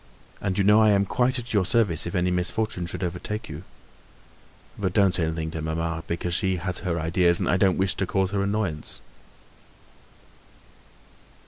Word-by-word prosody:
"And 95 -2 -1
you 100 - +3
know, 105 +2 +6
I 110 - +5
am 100 -1 +3
quite 125 +6 +1
at 120 -1 -6
your 100 -3 +3
service 100 -6 +1
if 85 - -5
any 90 0 +1
misfortune 90 +1 -1
should 85 - -5
overtake 90 +5 -4
you. 75 +3 -8 1.1
But 95 -3 -2
don't 100 -3 +4
say 85 -3 +1
anything 80 0 -3
to 80 - -5
mamma, 80 +1 -2
because 85 +1 -2
she 95 +1 +1
has 90 +1 -2
her 85 -2 -2
ideas, 85 +2 +2
and - - -1
I 90 - +3
don't 95 -1 +3
wish 95 -1 +1
to 95 - -1
cause 95 -1 0
her 100 -1 0
annoyance." 100 -6 -2
95 Hz, 180 wpm, -25 LUFS, 85-100 Hz, 1.1 s, know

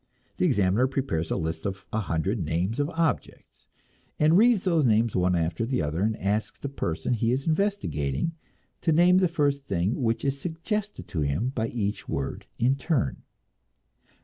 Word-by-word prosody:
The 180 - +3
examiner 105 - +3
prepares 130 - -2
a - - 0
list 80 -2 -3
of 100 0 -4
a 110 - +1
hundred 95 +1 -1
names 90 - -1
of 145 +1 +1
objects, 165 -2 -3 0.5
and 155 +2 +5
reads 220 0 +5
those 170 -5 +2
names 115 -2 +3
one 90 0 +2
after 85 +4 0
another, 85 - -1
and 110 +1 +1
asks 105 +3 -1
the 140 - -5
person 105 -4 -2
he 115 0 +1
is 130 +2 -1
investigating 165 - 0 0.5
to 165 - +2
name 175 +3 +5
the 185 - +4
first 145 -4 0
thing 95 +6 0
which 115 +1 0
is 140 0 0
suggested 200 +6 -3
to 80 - -2
him 75 - 0
by 115 -4 -2
each 105 -3 -3
word 70 -1 -3
in 125 +3 +3
turn. 140 - -1
115 Hz, 170 wpm, -26 LUFS, -, 0.5 s, and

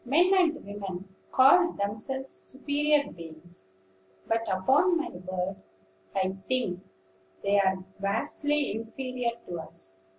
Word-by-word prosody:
"Men 330 +9 +4
and 340 -4 +2
women 195 -2 -6 0.2
call 345 +7 +6
themselves 220 +7 -3
superior 290 +1 0
beings; 165 - -12 0.6
but, 225 0 +1
upon 275 - +4
my 320 - -2
word, 185 +1 -4 0.6
I 190 0 0
think 240 -9 0 0.6
they 200 0 +4
are 190 -1 +1
vastly 290 +8 0
inferior 245 +2 -3 0.2
to 175 -1 -5
us. 95 - -6
210 Hz, 110 wpm, -28 LUFS, 185-285 Hz, 0.6 s, call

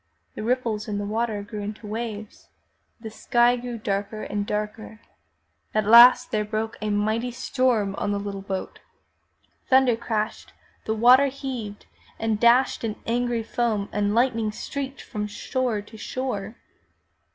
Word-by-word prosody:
The - - -6
ripples 230 -2 -1
in 205 -1 -2
the 205 - -3
water 215 0 -2
grew 210 0 -7
into 210 +2 -6
waves, 215 -1 -6 0.5
the 225 -1 -8
sky 240 +2 +3
grew 245 -1 -5
darker 205 0 -3
and 205 0 -3
darker. 210 +1 -4 0.8
At 215 -1 +2
last 235 +3 +8
there 210 -1 +1
broke 220 +1 -3
a 215 - -2
mighty 215 +4 0
storm 245 -4 0
on - - -1
the 205 - 0
little 200 -1 -5
boat. 195 -1 -5 0.9
Thunder 260 -2 +5
crashed, 220 -2 -3 0.3
the 220 - -1
water 250 +5 +6
heaved 255 -6 -6 0.3
and 220 -2 -1
dashed 240 +3 +4
in 220 -2 -2
angry 240 0 0
foam 220 -3 -1
and 205 0 0
lightning 230 -3 +2
streaked 275 +5 -5
from 210 -2 -4
shore 220 +1 -2
to 220 +2 -14
shore. 220 -3 -4
220 Hz, 145 wpm, -24 LUFS, 210-240 Hz, 0.9 s, last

